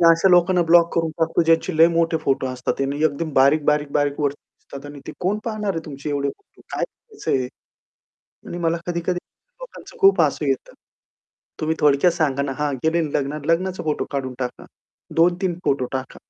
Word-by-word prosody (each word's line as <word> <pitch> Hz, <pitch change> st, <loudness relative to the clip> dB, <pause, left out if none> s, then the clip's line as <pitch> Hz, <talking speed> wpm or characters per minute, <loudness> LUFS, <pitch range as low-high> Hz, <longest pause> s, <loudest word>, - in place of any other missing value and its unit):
मी 170 Hz, -, +6 dB
अशा 165 Hz, +3 st, +4 dB
लोकांना 180 Hz, 0 st, +4 dB
ब्लॉक 170 Hz, 0 st, +5 dB
करून 165 Hz, -1 st, +1 dB
टाकतो, 165 Hz, +1 st, +2 dB
ज्यांचे 165 Hz, +1 st, +2 dB
लय 165 Hz, +1 st, +8 dB
मोठे 165 Hz, -1 st, +1 dB
फोटो 135 Hz, -4 st, 0 dB
असतात. 130 Hz, +1 st, -3 dB
आणि 140 Hz, +2 st, -1 dB
एकदम 155 Hz, +1 st, -1 dB
बारीक-बारीक-बारीक 145 Hz, +1 st, +2 dB
वरती 145 Hz, -1 st, +1 dB
दिसतात 140 Hz, +1 st, -12 dB
आणि 145 Hz, -1 st, -11 dB
ते -, -, -6 dB
कोण 190 Hz, +4 st, 0 dB
पाहणार 215 Hz, -3 st, -2 dB
आहे 165 Hz, -1 st, -4 dB
तुमचे 145 Hz, 0 st, -7 dB
एवढे 140 Hz, -1 st, -1 dB
फोटो 405 Hz, -, -12 dB
काय -, -, 0 dB
करायचंय 425 Hz, -, -4 dB
हे? 125 Hz, -, -4 dB, 1.0 s
आणि 175 Hz, -, -5 dB
मला 170 Hz, -1 st, 0 dB
कधी-कधी 175 Hz, +1 st, -1 dB, 0.4 s
लोकांचं -, -, -11 dB
खूप 390 Hz, -1 st, +6 dB
हसू -, -, 0 dB
येतं. -, -, -2 dB, 0.9 s
तुम्ही 160 Hz, 0 st, 0 dB
थोडक्यात 150 Hz, +4 st, +4 dB
सांगा 145 Hz, -5 st, 0 dB
ना, 140 Hz, -, -3 dB
हां, 150 Hz, -1 st, -1 dB
गेलेल 160 Hz, -1 st, +1 dB
लग्नात 145 Hz, +1 st, -2 dB
लग्नाचा 180 Hz, +3 st, 0 dB
फोटो 155 Hz, -2 st, -1 dB
काढून 135 Hz, -2 st, -3 dB
टाका. 125 Hz, -1 st, -5 dB, 0.5 s
2-3 175 Hz, +2 st, +2 dB
फोटो 135 Hz, -2 st, +1 dB
टाका. 130 Hz, 0 st, -5 dB
160 Hz, 175 wpm, -22 LUFS, 140-175 Hz, 1.0 s, लय